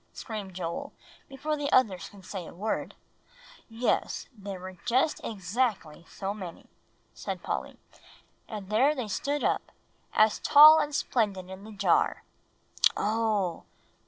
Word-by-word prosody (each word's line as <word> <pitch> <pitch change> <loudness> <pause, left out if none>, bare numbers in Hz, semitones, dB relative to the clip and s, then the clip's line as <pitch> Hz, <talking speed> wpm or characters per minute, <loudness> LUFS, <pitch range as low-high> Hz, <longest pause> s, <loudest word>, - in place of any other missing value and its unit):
screamed 205 -5 -7
Joel, 170 -2 -4 0.4
before 285 +3 -2
the 290 -1 -3
others 200 -8 +2
could 195 -2 -15
say 190 -3 -6
a - - -12
word. 210 +5 -3 0.7
"Yes, 230 +2 -1
I - - -28
guess 200 - -16
there 195 -2 -5
were 185 0 -9
just 260 +6 +1
exactly 195 -5 -2
so 195 0 -4
many," 185 -5 -8 0.5
said - - -6
Polly; - - -4 0.7
"and 210 -3 -7
there 265 +8 +4
they 250 -5 -3
stood 285 +8 -2
up, - - 0 0.4
as 215 0 +3
tall 305 +1 +9
and 295 -1 -1
splendid 195 -9 -1
in 190 +2 -9
the 220 - -10
jar." 205 - +1 0.8
"Oo!" 210 -5 0
215 Hz, 140 wpm, -28 LUFS, 190-255 Hz, 0.8 s, tall